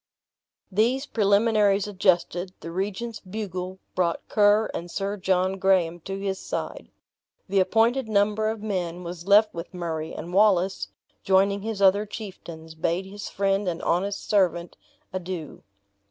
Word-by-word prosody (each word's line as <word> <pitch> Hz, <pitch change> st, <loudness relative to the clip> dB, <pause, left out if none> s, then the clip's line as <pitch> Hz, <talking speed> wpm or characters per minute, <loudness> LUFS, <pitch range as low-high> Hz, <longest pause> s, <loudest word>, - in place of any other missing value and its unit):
These 240 Hz, +8 st, +2 dB
preliminaries 205 Hz, -2 st, +3 dB
adjusted, 185 Hz, -2 st, +1 dB
the 165 Hz, -, -7 dB
regent's 205 Hz, +5 st, -3 dB
bugle 185 Hz, -2 st, -5 dB, 0.2 s
brought 170 Hz, -2 st, -1 dB
Ker 210 Hz, +1 st, +4 dB
and 175 Hz, -, -5 dB
Sir 200 Hz, +3 st, -2 dB
John 190 Hz, 0 st, 0 dB
Graham 180 Hz, -3 st, +2 dB
to 195 Hz, 0 st, -4 dB
his 195 Hz, -1 st, -2 dB
side. -, -, -5 dB, 0.6 s
The 195 Hz, 0 st, +2 dB
appointed 230 Hz, +6 st, +2 dB
number 215 Hz, +1 st, +2 dB
of 220 Hz, -1 st, -5 dB
men 180 Hz, -4 st, -3 dB
was 175 Hz, +1 st, -7 dB
left 210 Hz, +2 st, +6 dB
with 170 Hz, +2 st, -7 dB
Murray; 160 Hz, -2 st, -3 dB
and 175 Hz, -, -7 dB
Wallace, 195 Hz, -2 st, +3 dB, 0.4 s
joining 195 Hz, +1 st, +3 dB
his 215 Hz, -1 st, -3 dB
other 200 Hz, +2 st, +4 dB
chieftains, 170 Hz, -6 st, -9 dB
bade 170 Hz, +3 st, -1 dB
his 200 Hz, +1 st, -7 dB
friend 195 Hz, 0 st, 0 dB
and 170 Hz, -2 st, -1 dB
honest 195 Hz, +4 st, -1 dB
servant 180 Hz, -4 st, +1 dB, 0.4 s
adieu. 180 Hz, -4 st, -5 dB
195 Hz, 140 wpm, -25 LUFS, 180-205 Hz, 0.6 s, left